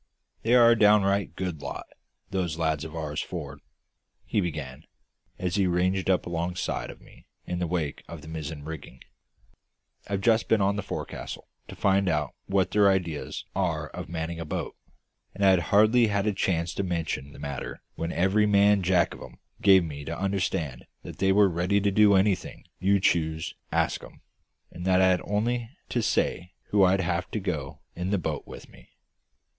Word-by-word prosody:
"They 115 +2 +3
are 120 -1 +7
a - - +5
downright 100 -2 +3
good 90 -6 -4
lot - - -6 0.5
those 90 -4 -1
lads 80 -3 0
of 80 0 -8
ours, 75 -2 -3
for'ard," - - -6 0.7
he 105 - 0
began, 75 -7 -5 0.5
as 90 0 -2
he 95 -2 +3
ranged 90 +2 +1
up 95 - +2
alongside 85 +1 -3
of - - -10
me - - -19 0.2
in 90 - -3
the 90 - -1
wake 80 -4 -2
of 80 -3 -9
the - - -11
mizzen 80 -2 -6
rigging. 75 -5 -9 1.0
"I've 100 -1 -2
just 115 +1 +3
been 110 - +3
on 100 0 +2
the 100 - -2
fo'c's'le - - -6 0.2
to - - -9
find 95 -1 +2
out 75 -5 -1
what 95 -1 +1
their 105 -1 +5
ideas 85 -6 -2
are - - -1
about - - -7
manning 85 0 -4
a - - -3
boat; - - -4 0.6
and 100 - +1
I'd 95 -2 +6
hardly 110 +3 +5
had 100 -1 0
a 105 - +1
chance 85 -3 0
to 100 - -2
mention 80 -6 -3
the - - -13
matter 70 -1 -6
when 80 +1 -4
every 95 +4 +2
man 100 0 +4
Jack 90 -1 +2
of - - -12
'em - - -11 0.2
gave 95 -2 +6
me 75 -3 -6
to 85 +2 -4
understand 95 -9 -2 0.2
that - - -9
they 95 0 +3
were 100 +1 +5
ready 90 +3 +1
to 100 0 +1
do 105 0 +5
anything 95 -1 0
you 100 +2 +3
choose 80 -3 +1
to - - -14 0.2
ask - - 0
'em, - - -14 0.5
and 90 - -8
that 95 -1 +4
I'd 95 -1 +4
only 115 +3 -1 0.2
to 120 - 0
say 90 -4 0 0.2
who 100 -2 +5
I'd 95 +1 +3
have 85 -1 -1
to - - -3
go - - -4
in 90 +2 -3
the 100 - +2
boat 80 -5 -4
with - - -10
me. - - -18
90 Hz, 185 wpm, -27 LUFS, 80-100 Hz, 1.0 s, are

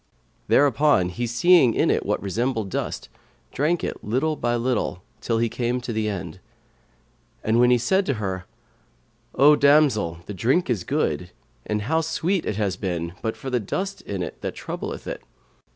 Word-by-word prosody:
Thereupon 140 -8 +4
he 120 +7 -3
seeing 125 +1 +5
in - - +3
it - - +1
what - - -1
resembled 110 0 -1
dust, - - -3 0.4
drank 160 +5 0
it, - - -4
little 130 +9 0
by 120 -4 0
little, 115 -6 -1 0.2
till 115 - 0
he 115 +1 +2
came 120 +2 -1
to 120 -1 -5
the 110 -1 -1
end; 95 -4 -5 1.0
when 120 +3 +4
said 190 - +1
he 140 - +2
to - - -6
her, 95 -4 -3 0.9
"O 145 +3 +7
damsel, 140 - +3
the 105 - -6
drink 125 - +1
is 105 -7 -1
good, - - -1 0.4
and 105 -1 -1
how 160 +8 +1
sweet 170 +3 -1
it 105 - -1
had 100 -3 -2
been 85 -3 -2
but 110 - -3
for 135 - -6
this 125 -2 +1
dust 190 - -3
in 95 -3 -4
it - - -8
that - - -4
troubleth - - -6
it." - - -5
120 Hz, 170 wpm, -24 LUFS, 105-145 Hz, 1.0 s, O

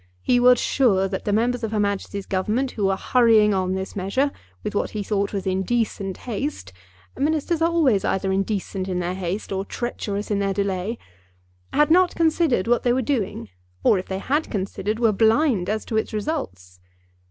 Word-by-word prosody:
He 245 - +3
was 250 0 +6
sure 200 -8 +2
that 190 0 -5
the 205 - 0
members 240 +3 +1
of 220 - -2
her 215 - 0
Majesty's 200 -1 -2
Government, 215 +8 -1
who 205 - -2
were 195 0 +2
hurrying 225 -4 +4
on 185 -1 0
this 190 0 -5
measure 205 +9 0 0.3
with - - -3
what 205 - 0
he 205 - -2
thought 200 0 -1
was 195 -2 -3
indecent 195 0 -1
haste, 240 - -4 0.4
ministers 315 +3 0
are 330 - +4
always 285 - +2
either 190 0 0
indecent 195 -1 -2
in 180 - -1
their 180 0 -2
haste 185 +3 -4
or 195 0 -1
treacherous 205 -2 -4
in 200 - +1
their 195 -1 0
delay, 200 +2 -1 0.7
had 295 +2 +3
not 360 +1 +4
considered 320 - +2
what 240 0 +3
they 240 - +2
were 260 +1 0
doing, 210 - -2 0.3
or, 200 - +4
if 185 - -7
they 190 - -3
had 290 +10 -1
considered, 200 +1 -3
were 230 -2 +3
blind 220 - +2
as 215 +1 -2
to 220 - -2
its 220 - -1
results. 95 - -4
210 Hz, 185 wpm, -23 LUFS, 190-245 Hz, 0.7 s, was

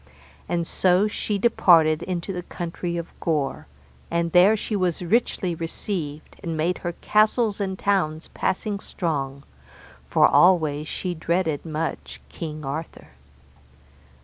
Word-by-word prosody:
And 170 -1 0
so 185 +4 +3
she 210 -1 -2
departed 170 -7 +4
into 180 +1 -3
the 180 - -4
country 170 0 -4
of 170 0 -5
Gore, 150 -5 -1 0.4
and 170 0 0
there 185 +5 +6
was 185 -5 +1
she 180 - -6
richly 195 -3 +1
received, 165 -2 -5
and 165 -4 -3
made 170 +4 0
her 175 -1 -3
castles 215 0 +2
and 190 -1 -2
towns 175 -6 0
passing 200 +2 -2
strong, 140 -8 -3 0.7
for - - +5
always 155 -5 +4
she 180 +2 -3
dreaded 165 -2 -1
much 160 +1 -4
King 155 -3 -6
Arthur. 155 +4 -6
170 Hz, 125 wpm, -24 LUFS, 160-190 Hz, 0.7 s, there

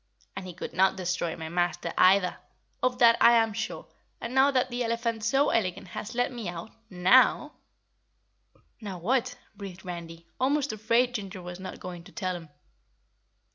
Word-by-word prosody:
"And 185 - -6
he 180 - -8
could - - -7
not 190 0 +3
destroy 180 -2 -2
my 160 -1 -6
Master 175 -1 -1
either. 185 0 +4 0.4
Of 255 -1 +1
that 235 -2 +6
I 235 - +8
am 225 -2 +3
sure, 220 +1 -4 0.3
and 235 - -5
now 265 +1 +5
that 255 -2 +1
the 245 0 -1
elephant 230 -1 -2
so 270 +6 +2
elegant 185 -4 -1
has 215 +6 -6
let 245 +2 +1
me 235 -7 -5
out 175 +4 -7 0.2
NOW 220 +10 +4 0.6
" - - -38
"Now 200 -4 -6
what?" 250 +7 0 0.2
breathed 195 -2 -9
Randy, 170 -2 -8
almost 280 0 +1
afraid 230 +3 +1
Ginger 195 -4 -6
was 180 +1 -8
not 185 - -8
going 175 -2 -8
to 195 - -14
tell 185 -5 -3
him. 165 -3 -9
205 Hz, 175 wpm, -28 LUFS, 180-240 Hz, 0.6 s, I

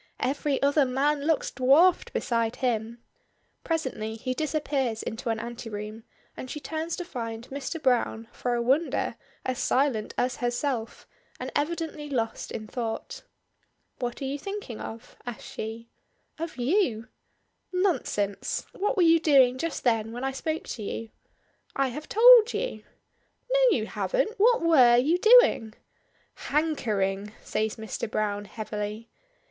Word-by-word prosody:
Every 275 +1 0
other 285 +1 +4
man 280 +3 +1
looks 320 -3 +1
dwarfed 285 +8 +4
beside 230 -2 0
him. 235 -1 -2 0.6
Presently 260 -10 -2
he 255 +3 -3
disappears 280 -5 -1
into 225 +2 -4
an 225 -1 0
anteroom, 225 -1 -7 0.3
and 255 - -7
she 300 - -5
turns 320 +3 -3
to 355 - -5
find 230 -6 -6
Mr. 280 +4 -4
Browne, 245 -4 +1
for 245 -1 -2
a 235 - 0
wonder, 275 +7 +1 0.3
as 255 0 -2
silent 260 -7 +1
as 245 0 0
herself, 240 -1 -2 0.3
and - - -5
evidently 305 -1 -2
lost 230 -5 -2
in 215 - -5
thought. 235 - -5 0.8
"What 245 +2 -3
are - - -2
you 275 +2 -3
thinking 395 - -6
of?" 225 +2 -9
asks 240 - -6
she. 225 +1 -6 0.5
"Of 330 -3 -5
you!" 250 - +1 0.6
"Nonsense! 335 - -1
What 410 +1 -1
were 365 - +5
you 330 0 +6
doing 265 -5 +4
just 330 +1 -3
then 225 -3 +1
when 245 +2 -5
I 270 - 0
spoke 315 +4 -3
to 230 - -5
you?" 225 +2 -5 0.6
"I 275 -1 +1
have 300 +5 -8
told 475 0 +8
you." - - -3 0.7
"No, - - +4
you - - -2
haven't. - - -1
What 465 -1 +4
were 255 -8 +6
you 310 +8 +3
doing?" 435 - +6 0.7
"Hankering!" 210 -10 0
says 215 0 -1
Mr. 220 0 -5
Browne, 205 -1 -1
heavily. 210 +1 -5
255 Hz, 140 wpm, -27 LUFS, 225-315 Hz, 0.8 s, told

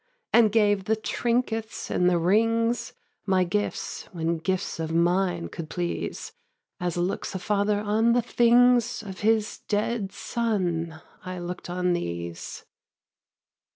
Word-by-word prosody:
And 225 -3 +6
gave 205 -3 +3
the 220 +1 +2
trinkets 225 0 -2
and 180 0 +3
the 175 - +3
rings, 230 +6 +2 0.3
My 190 -1 +3
gifts, 205 +4 -2
when 165 -2 -1
gifts 185 +1 -2
of 160 0 -2
mine 175 +1 +1
could 160 -2 -7
please; 175 - -3 0.5
As 175 -2 -2
looks 180 +2 -2
a - - +1
father 205 +2 +1
on 215 +3 +2
the 245 - +3
things 240 0 +4
Of 190 -3 -8
his 215 0 +1
dead 210 -1 -1
son, 175 -10 -2 0.2
I 185 0 -5
look'd 175 0 -6
on 180 0 +1
these. 85 - -5
195 Hz, 130 wpm, -26 LUFS, 175-225 Hz, 0.5 s, And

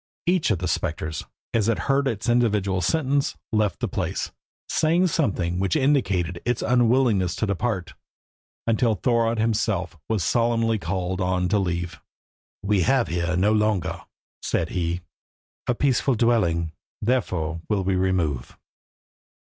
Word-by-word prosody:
Each 180 -1 +2
of 105 - +2
the 90 +2 -3
spectres, 80 -1 -2 0.3
as 115 -1 +2
it 115 - +2
heard 140 0 +2
its 110 -2 -2
individual 105 -6 +2
sentence, 140 - +1
left 105 -3 +1
the - - +1
place, - - -3 0.4
saying 165 +4 +2
something 95 - 0
which 95 +7 +1
indicated 100 - +1
its 120 -1 -1
unwillingness 120 -6 +3
to - - -1
depart, 100 -3 -2 0.7
until 115 0 +2
Thorodd 115 +2 +1
himself 110 -5 0
was 110 -5 +1
solemnly 115 +1 +2
called 95 +1 -2
on 90 0 +1
to 105 - +3
leave. 85 -1 -3 0.6
"We 100 -1 +2
have 130 +6 +2
here 85 +1 -1
no 100 +4 +3
longer," 105 -4 0 0.4
said - - -1
he, 85 0 -2 0.7
"a 125 - +2
peaceful 135 0 +2
dwelling, 90 -9 +2 0.3
therefore 90 -9 -1
will 100 -3 +1
we 95 +1 +1
remove." 90 -9 -1
105 Hz, 135 wpm, -24 LUFS, 90-120 Hz, 0.7 s, unwillingness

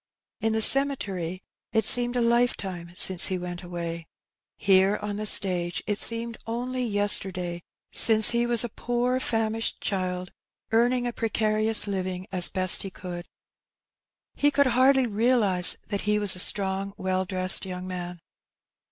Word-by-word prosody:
In 225 0 -2
the 220 0 +2
cemetery 195 -11 0 0.3
it 220 -2 0
seemed 245 0 +3
a 245 - -1
life 235 +1 0
time 175 -3 -9
since 185 -2 +4
he 185 - -3
went 175 -1 -8
away; 170 -2 -8 0.5
here, 195 +1 +2
on 205 -1 -6
the 215 0 -3
stage, 180 -4 +1
it 210 -1 -2
seemed 230 0 +3
only 250 +2 -5
yesterday 190 -5 +1 0.3
since 220 -1 +5
he 235 0 -1
was 235 -1 +4
a 240 - -5
poor 245 +3 -3
famished 225 -2 -3
child, 185 -2 -4 0.4
earning 245 +2 0
a 240 - -4
precarious 215 -1 -1
living 185 -2 -5
as 180 -2 +4
best 185 -1 +5
he 195 - -6
could. 175 -1 -10 1.1
He 290 - 0
could 285 -1 +1
hardly 260 +1 +2
realize 215 -5 +2
that 200 -1 -4
he 210 0 -1
was 205 -3 +3
a - - -8
strong, 195 +1 0
well 185 0 -3
dressed 185 0 +4
young 180 0 -8
man. 180 -1 -8
205 Hz, 150 wpm, -24 LUFS, 185-235 Hz, 1.1 s, since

